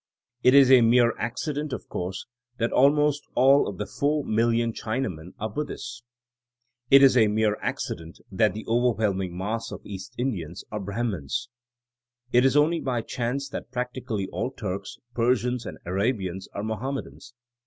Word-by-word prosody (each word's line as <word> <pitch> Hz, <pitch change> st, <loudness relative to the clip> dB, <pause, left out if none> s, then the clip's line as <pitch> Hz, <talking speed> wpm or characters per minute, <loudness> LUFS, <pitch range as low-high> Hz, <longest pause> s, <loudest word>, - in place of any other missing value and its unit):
It 125 Hz, +2 st, +5 dB
is 135 Hz, -2 st, +7 dB
a 130 Hz, -2 st, +8 dB
mere 120 Hz, 0 st, +4 dB
accident, 145 Hz, +6 st, -3 dB
of -, -, -6 dB
course, 95 Hz, +2 st, -4 dB, 0.3 s
that 115 Hz, 0 st, 0 dB
ahnost 145 Hz, +2 st, +4 dB
all 135 Hz, +3 st, +5 dB
of 100 Hz, -, -5 dB
the -, -, -3 dB
400,000,000 115 Hz, -5 st, +1 dB
China 120 Hz, +4 st, -2 dB
men 80 Hz, +2 st, -11 dB
are 110 Hz, -, -2 dB
Buddhists. 125 Hz, 0 st, -5 dB, 0.9 s
It 140 Hz, 0 st, +8 dB
is 135 Hz, -2 st, +7 dB
a 110 Hz, -3 st, +5 dB
mere 105 Hz, 0 st, +2 dB
accident 85 Hz, 0 st, -4 dB
that 100 Hz, +1 st, +2 dB
the 110 Hz, -, -6 dB
overwhelming 105 Hz, -6 st, +1 dB
mass 110 Hz, +5 st, -3 dB
of -, -, -8 dB
East 100 Hz, +4 st, -8 dB
Indians 95 Hz, -, -3 dB
are 105 Hz, -, -3 dB
Brahmans. 100 Hz, -, -3 dB, 0.8 s
It 125 Hz, +1 st, +6 dB
is 135 Hz, +2 st, +4 dB
only 160 Hz, +3 st, +3 dB
by 125 Hz, -5 st, -2 dB
chance 125 Hz, +5 st, -2 dB
that -, -, -6 dB
practi 125 Hz, +1 st, -4 dB
cally 100 Hz, -4 st, -2 dB
all -, -, -2 dB
Turks, 100 Hz, -6 st, -5 dB, 0.2 s
Persians 125 Hz, 0 st, +1 dB
and -, -, -7 dB
Arabians 95 Hz, -1 st, -1 dB
are 100 Hz, -, -5 dB
Mohammedans. 125 Hz, +2 st, -5 dB
115 Hz, 155 wpm, -26 LUFS, 100-130 Hz, 0.9 s, a